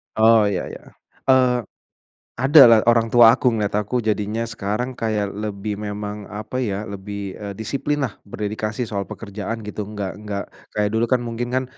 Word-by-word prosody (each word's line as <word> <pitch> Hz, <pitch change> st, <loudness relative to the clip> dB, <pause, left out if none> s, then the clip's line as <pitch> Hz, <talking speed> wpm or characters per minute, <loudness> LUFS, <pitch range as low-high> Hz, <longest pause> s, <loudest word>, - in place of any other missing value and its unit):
Oh, 110 Hz, -1 st, +5 dB
iya 95 Hz, -3 st, -1 dB
iya. -, -, -10 dB, 0.5 s
Eee, 130 Hz, -2 st, +4 dB, 0.8 s
ada 135 Hz, +4 st, +7 dB
lah 115 Hz, -1 st, +7 dB
orang 115 Hz, -1 st, +4 dB
tua 115 Hz, -2 st, +8 dB
aku, 125 Hz, -, +2 dB
ngeliat 105 Hz, -2 st, -1 dB
aku 110 Hz, +4 st, -1 dB
jadinya 105 Hz, +1 st, -1 dB
sekarang 115 Hz, +4 st, -3 dB
kayak 105 Hz, -3 st, -1 dB
lebih 105 Hz, 0 st, -4 dB
memang 105 Hz, 0 st, -5 dB
apa 105 Hz, +5 st, -6 dB
ya, 105 Hz, -5 st, -1 dB
lebih, 100 Hz, 0 st, -6 dB
eee, 100 Hz, -1 st, -6 dB
disiplinlah 135 Hz, +3 st, -2 dB
berdedikasi 105 Hz, +3 st, -3 dB
soal 100 Hz, -2 st, -3 dB
pekerjaan 110 Hz, +1 st, -6 dB
gitu, 105 Hz, 0 st, -5 dB
enggak 100 Hz, -2 st, -5 dB
enggak 105 Hz, -2 st, -4 dB, 0.3 s
kayak 105 Hz, -1 st, +1 dB
dulu 115 Hz, +2 st, +1 dB
kan 125 Hz, 0 st, +2 dB
mungkin 120 Hz, +1 st, -4 dB
kan 130 Hz, 0 st, +1 dB
105 Hz, 165 wpm, -22 LUFS, 105-120 Hz, 0.8 s, tua